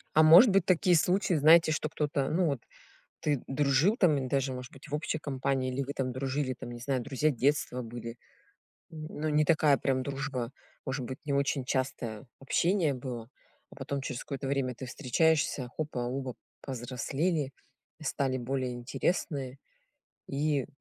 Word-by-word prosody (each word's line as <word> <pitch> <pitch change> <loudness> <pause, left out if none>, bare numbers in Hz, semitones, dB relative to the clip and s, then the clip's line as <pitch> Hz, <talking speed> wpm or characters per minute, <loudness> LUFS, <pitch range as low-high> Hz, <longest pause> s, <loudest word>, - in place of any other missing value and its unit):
А, 155 - +7
может 170 +9 +9
быть, 195 -2 +3
такие 180 -1 +4
случаи, 180 +3 +2
знаете, 160 +2 +6
что 155 0 -1
кто-то, 145 -2 -1
ну, 175 +2 +2
вот 140 -5 -1 0.6
ты 145 -4 0
дружил 145 - +2
там, 155 - +4
ин 130 -1 -3
даже, 135 -1 0
может 125 -1 -7
быть, 135 +2 -13
в 145 - -4
общей 155 +1 -1
компании, 135 -2 -1
или 135 +2 -1
вы 140 +1 -4
там 130 -3 -2
дружили, 130 +1 -2
там, - - -7
не 120 0 -8
знаю, 130 0 -1
друзья 140 +3 +1
детства 130 -1 0
были. 115 0 -7 0.7
Ну, 155 -1 -5
не 150 0 +3
такая 150 -3 +4
прям 130 -1 0
дружба. 135 -3 -3 0.3
Может 130 -1 -3
быть, 130 +2 -6
не 145 - -1
очень 140 -1 0
частое 130 -4 -2
общение 165 +3 +1
было, 125 -3 -6 0.4
а - - -13
потом 140 -1 -4
через 130 -2 -4
какое-то 140 -1 -5
время 135 -2 -1
ты 130 - -7
встречаешься- 140 0 +1
хопа, 150 -5 -3
оба 130 +1 -3 0.3
повзрослели, 135 +4 -2 0.5
стали 135 -3 -1
более 130 0 -2
интересные, 135 +2 -2 0.7
и 145 -1 0
140 Hz, 160 wpm, -30 LUFS, 130-155 Hz, 0.7 s, может